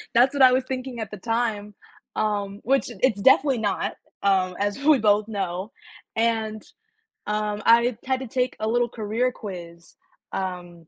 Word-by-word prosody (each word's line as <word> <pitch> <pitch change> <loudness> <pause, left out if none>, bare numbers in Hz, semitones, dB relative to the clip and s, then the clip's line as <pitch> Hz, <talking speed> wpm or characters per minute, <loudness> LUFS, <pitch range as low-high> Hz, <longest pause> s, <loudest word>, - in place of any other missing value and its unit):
That's 250 +4 +5
what 280 - 0
I 255 - +8
was 255 +1 +2
thinking 255 -2 -5
at 220 -2 -5
the 210 - -7
time, 215 -1 -2 0.4
um, 205 -2 -1
which 270 +1 +1
it's 225 -6 +2
definitely 270 +2 +5
not, 205 -2 -1 0.3
um, 185 -2 +2
as 205 +4 -1
we 305 0 +6
both 210 -1 +3
know, 195 -1 -3 0.4
and, 220 -2 0 0.6
um, 210 0 -2
I 235 0 +5
had 260 0 0
to 260 - -5
take 250 +2 -1
a 215 - -1
little 240 +1 +1
career 230 +2 -1
quiz, 170 -7 -9 0.4
um, 175 -3 -5
215 Hz, 160 wpm, -24 LUFS, 200-245 Hz, 0.6 s, I